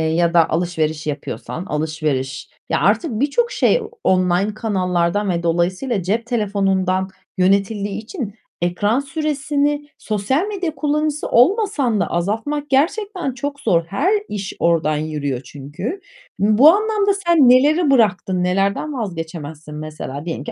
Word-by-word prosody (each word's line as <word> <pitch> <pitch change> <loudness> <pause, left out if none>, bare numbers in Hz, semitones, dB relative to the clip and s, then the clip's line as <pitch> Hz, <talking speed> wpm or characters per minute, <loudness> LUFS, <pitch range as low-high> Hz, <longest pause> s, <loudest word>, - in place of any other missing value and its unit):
ya 170 0 +2
da 165 -2 +4
alışveriş 160 -2 -1
yapıyorsan, 150 +4 -5
alışveriş 150 -4 -2 0.2
Ya, - - +1
artık 330 - +2
birçok 380 - +1
şey - - +2 0.2
online 185 +2 +2
kanallardan 190 -2 0
ve 170 -1 -1
dolayısıyla 180 +6 0
cep 220 +6 -1
telefonundan 195 -5 0 0.3
yönetildiği 200 +2 +1
için 220 - -6 0.3
ekran 205 +7 +1
süresini 290 0 -1
sosyal 220 - -1
medya 370 -7 -3
kullanıcısı 300 0 -1
olmasan 280 - +3
da - - +1
azaltmak 225 - -2
gerçekten 345 - 0
çok 285 +3 -5
zor. 170 - +2
Her 280 - +1 0.2
iş 200 -2 -4
oradan 160 -3 +2
yürüyor 150 -4 -3
çünkü. 155 - -6 0.4
Bu 215 +8 +6
anlamda 415 0 +1
sen 315 -7 +6
neleri 290 +5 +4
bıraktın? 190 -7 +2
Nelerden 195 +10 0
vazgeçemezsin? 165 - -6
Mesela 150 -1 -6
diyelim 165 -4 -4
ki - - -6
205 Hz, 125 wpm, -20 LUFS, 170-285 Hz, 0.4 s, Bu